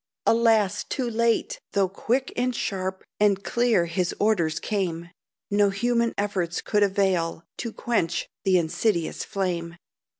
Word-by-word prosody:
Alas, 225 -4 +3
too 255 -3 -3
late! 235 - +1
Though 195 -1 +3
quick, 245 +7 -1
and 250 0 0
sharp, 190 -3 -3 0.2
And 205 -1 +3
clear 235 -7 +2
his 170 +1 -1
orders 175 -7 +2
came, 175 -5 -2 0.4
No 205 0 +4
human 235 +3 0
efforts 190 -4 -1
could 210 - 0
avail 190 -5 +1
To 230 - -4
quench 195 -8 -1 0.2
the 190 -1 +4
insidious 170 +1 0
flame. 175 -3 -3
200 Hz, 130 wpm, -25 LUFS, 175-230 Hz, 0.4 s, No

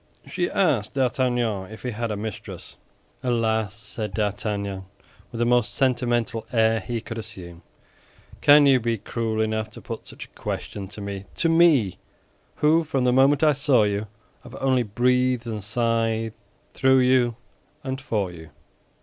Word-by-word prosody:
She 175 -2 -2
asked 140 - +1
D'Artagnan 120 -6 0
if 110 - -11
he 125 - -2
had 115 +1 -3
a 105 - -3
mistress. 110 0 -7 0.5
"Alas!" 110 -4 0
said 105 -1 -6
D'Artagnan, 100 -2 -2 0.5
with 115 - -7
the 120 - +1
most 120 -2 +2
sentimental 120 -3 0
air 110 -2 +3
he 115 +4 -4
could 115 +1 -6
assume, 90 -6 -8 0.8
"can 145 0 +7
you 135 -2 +5
be 115 -1 -1
cruel 110 +1 -3
enough 110 0 -1
to - - -9
put - - -8
such - - -8
a - - -24
question 100 -2 -5
to 105 +2 -10
me—to 100 - -3
me, 155 - +4 0.6
who, 160 +2 +3
from 140 -4 -1
the 125 0 +3
moment 135 +3 +4
I 155 -1 +5
saw 135 -5 +3
you, 105 +1 -1 0.3
have 125 - -12
only 130 -2 +1
breathed 125 +2 +1
and 110 -3 -4
sighed 115 0 0 0.4
through 130 0 +4
you 125 -2 +3 0.5
and 135 0 -4
for 105 -9 -2
you?" 80 -2 -12
115 Hz, 155 wpm, -24 LUFS, 105-130 Hz, 0.8 s, can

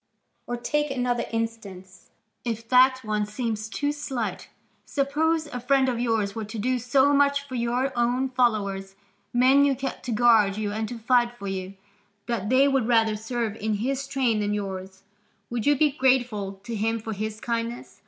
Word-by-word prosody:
Or 240 - -2
take 295 +5 -1
another 245 -2 -1
instance, 210 -5 -6 0.3
if 230 -1 -4
that 260 +1 +5
one 210 -1 -1
seems 220 -1 -3
too 290 +5 -1
slight: 270 -6 -4 0.3
suppose 310 +3 0
a 250 -5 -6
friend 265 +2 +2
of 245 -2 -1
yours 225 -4 0
were 225 - -4
to 210 +2 -7
do 250 +4 0
so 265 +4 +3
much 280 0 +2
for 260 - -10
your 250 +2 0
own 245 +2 +1
followers, 200 -6 0 0.4
men 260 +3 +5
you 280 -1 +3
kept 270 +1 -5
to 250 - -3
guard 220 -3 +4
you 210 -1 -2
and 215 0 -3
to 245 - -6
fight 240 +1 +2
for 200 - -8
you, 190 0 -4 0.5
that 220 -4 -2
they 260 +2 +5
would 270 -4 +1
rather 225 -2 +3
serve 225 0 -3
in 215 0 -1
his 270 +6 -2
train 260 -5 +1
than 210 0 0
yours, 190 -1 -6 0.5
would 235 0 -2
you 290 - +5
be 300 +1 +3
grateful 250 -7 +1
to 235 +1 -5
him 225 +2 0
for 220 0 -5
his 215 +1 -4
kindness? 235 +1 -4
235 Hz, 180 wpm, -25 LUFS, 215-260 Hz, 0.5 s, that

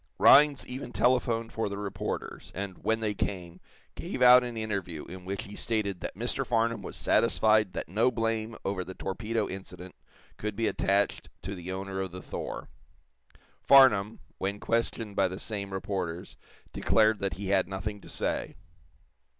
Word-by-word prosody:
Rhinds 145 0 +6
even 125 -1 -6
telephoned 115 -1 +1
for 110 -2 -1
the 100 - -5
reporters, 100 -1 -5
and, 95 0 -6
when 110 0 +1
they 105 -2 0
came, 90 -3 -4 0.3
gave - - -5
out 125 0 +8
an 120 -2 -5
interview 100 -8 -3
in 90 +1 -10
which 100 +1 -3
he 100 - -10
stated 105 -5 -1
that - - -5
Mr. 120 +5 -1
Farnum 115 -3 0
was - - -8
satisfied 110 -3 +3
that - - -4
no 110 +9 +2
blame 115 -1 -1
over 95 -2 -1
the 95 +1 -9
torpedo 110 +3 -2
incident 95 -1 -8 0.4
could 105 -1 -4
be 115 +2 0
attached 100 -1 0
to 95 +3 -4
the 90 -1 -6
owner 95 0 -4
of 95 -2 -4
the 90 - -8
"Thor." - - -5 0.9
Farnum, 115 -6 +6 0.2
when 100 +2 -2
questioned 115 -2 -1
by 95 - +3
the 95 0 -6
same 100 -3 -5
reporters, 95 -3 -4 0.4
declared 110 -1 +3
that 100 -1 -1
he 95 0 -5
had 95 -2 +3
nothing 100 +2 -5
to - - -13
say. - - -2
100 Hz, 165 wpm, -29 LUFS, 95-115 Hz, 0.9 s, out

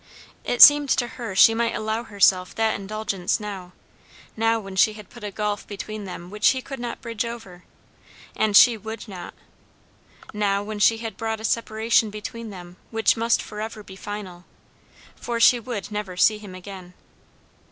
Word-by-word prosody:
It 245 - +6
seemed 290 -1 +8
to 240 -2 +1
her 230 -5 -7
she 225 - +7
might 230 +1 0
allow 220 +1 -2
herself 195 -4 +2
that 225 -1 +1
indulgence 200 -2 -2
now; 195 -4 -7 0.6
now 225 +1 +1
when 195 -2 -9
she 190 +3 +4
had 210 -2 -13
put 240 - -13
a 210 - -3
gulf 210 0 -3
between 210 +1 -7
them 180 -1 -8
which 210 0 +1
he 260 - 0
could 270 -2 -8
not 240 -1 -5
bridge 230 -1 -3
over, 225 -7 -8 0.7
and 210 -2 +3
she 240 -3 +7
would 220 +2 -8
not; 180 -4 -9 1.0
now 200 -1 0
when 210 0 -6
she 225 +2 +4
had 225 -1 -7
brought 225 -1 -3
a - - -10
separation 225 0 +1
between 225 +2 -7
them 180 -2 -11
which 225 -1 +2
must 230 +1 +1
forever 215 0 -7
be 190 - -12
final. 190 -3 -8 0.7
For 235 -1 -4
she 240 +1 +6
would 220 -3 -6
never 210 -3 -5
see 215 +3 +4
him 200 -3 -10
again. 185 -1 -10
215 Hz, 175 wpm, -23 LUFS, 195-225 Hz, 1.0 s, seemed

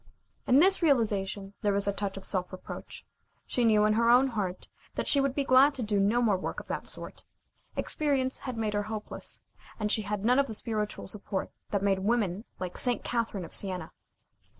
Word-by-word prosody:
In 255 - +5
this 380 +6 +5
realization 205 - +1
there 205 -1 +2
was 200 0 +1
a 200 - +2
touch 200 -1 -3
of 195 - -5
self 185 -2 -1
reproach. 185 - -8 0.4
She 245 - 0
knew, 215 -2 +5
in 215 - +3
her 230 +1 +3
own 255 +3 +6
heart, 200 -6 -3 0.3
that - - -2
she 280 - +4
would 275 -1 0
be 280 - +1
glad 275 +2 +5
to 255 - -3
do 210 -2 +1
no 215 +5 +3
more 210 -5 +3
work - - -4
of - - -10
that - - -3
sort. - - -9 0.5
Experience 270 -4 0
had 255 -3 -5
made 215 -2 -1
her 205 - +1
hopeless, 215 -1 -3 0.4
and 210 -1 0
she 220 - +4
had 205 0 -3
none 250 +3 +5
of 280 - +2
the 220 - -3
spiritual 210 -2 -3
support 195 -1 -3 0.2
that 200 -1 -1
made 195 -1 +2
women 205 -1 0
like 180 -1 -5
St. 245 -2 +1
Catherine 230 -6 -2
of - - -11
Sienna. 185 -5 -2
215 Hz, 205 wpm, -29 LUFS, 200-245 Hz, 0.5 s, own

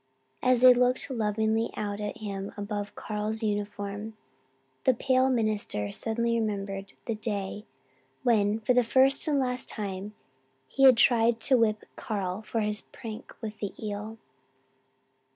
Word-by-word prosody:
As 250 -1 +3
they 255 0 +10
looked 250 +2 +1
lovingly 220 -1 0
out 205 -1 -3
at 210 +1 -4
him 200 -2 -5
above 205 0 -4
Carl's 215 +1 -2
uniform 205 0 -3 0.7
the 260 - +4
pale 260 +1 +2
minister 215 - -1
suddenly 230 - 0
remembered 195 -2 -3
the 230 - -1
day 210 -1 -4 0.6
when 215 -3 +3
for 235 +4 +2
the 250 0 +4
first 265 +5 +3
and 295 -2 +2
last 250 -1 -1
time 200 0 -5 0.5
he 270 - +3
had 255 -3 +8
tried 230 -1 +4
to 265 - +4
whip 215 -3 +2
Carl 195 -2 -3
for 225 +1 -2
his 210 0 -1
prank 225 -3 -9
with 215 -1 -6
the 205 - -4
eel. 210 +1 -5
215 Hz, 140 wpm, -28 LUFS, 205-235 Hz, 0.7 s, they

